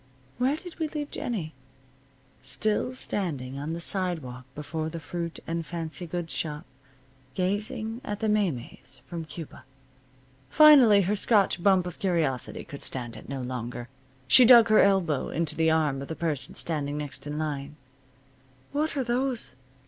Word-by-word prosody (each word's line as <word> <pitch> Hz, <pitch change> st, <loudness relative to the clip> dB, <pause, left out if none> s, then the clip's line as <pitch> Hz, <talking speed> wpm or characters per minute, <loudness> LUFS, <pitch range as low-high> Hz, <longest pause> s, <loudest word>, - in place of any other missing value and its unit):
Where 265 Hz, +4 st, +2 dB
did 355 Hz, 0 st, -11 dB
we 320 Hz, -, 0 dB
leave 295 Hz, -1 st, -5 dB
Jennie? 175 Hz, -10 st, -4 dB, 0.9 s
Still 210 Hz, -, -1 dB
standing 140 Hz, -, -3 dB
on 150 Hz, +3 st, -4 dB
the 170 Hz, -, -4 dB
sidewalk 165 Hz, -10 st, -2 dB
before 155 Hz, +2 st, -4 dB
the 165 Hz, -, -6 dB
fruit 170 Hz, +1 st, -5 dB
and 165 Hz, 0 st, -2 dB
fancy 165 Hz, +2 st, -5 dB
goods 170 Hz, 0 st, -4 dB
shop, 150 Hz, -2 st, -3 dB, 0.7 s
gazing 215 Hz, +5 st, -2 dB
at 205 Hz, -5 st, -4 dB
the 220 Hz, -, -1 dB
maymeys 165 Hz, -, -2 dB
from 170 Hz, -2 st, -6 dB
Cuba. 160 Hz, 0 st, -9 dB, 0.9 s
Finally 265 Hz, -, +8 dB
her 200 Hz, +4 st, +1 dB
Scotch 205 Hz, -3 st, +2 dB
bump 190 Hz, -1 st, +4 dB
of 180 Hz, -, -7 dB
curiosity 165 Hz, -9 st, 0 dB
could 140 Hz, -, -10 dB
stand 120 Hz, -3 st, -3 dB
it -, -, -11 dB
no 135 Hz, -1 st, -4 dB
longer. 120 Hz, -1 st, -5 dB, 0.4 s
She 200 Hz, -, +8 dB
dug 235 Hz, -2 st, +8 dB
her 215 Hz, -, +6 dB
elbow 185 Hz, -8 st, +2 dB
into 160 Hz, -1 st, -2 dB
the 160 Hz, 0 st, +3 dB
arm 150 Hz, -4 st, +1 dB
of 140 Hz, -, -6 dB
the 160 Hz, -, -5 dB
person 155 Hz, -6 st, -2 dB
standing 145 Hz, -3 st, -1 dB
next 145 Hz, 0 st, -6 dB
in 150 Hz, +1 st, -4 dB
line. 145 Hz, -2 st, -4 dB, 1.0 s
"What 300 Hz, +1 st, -1 dB
are 270 Hz, -, +1 dB
those?" 245 Hz, -, -1 dB
170 Hz, 155 wpm, -27 LUFS, 145-210 Hz, 1.0 s, Finally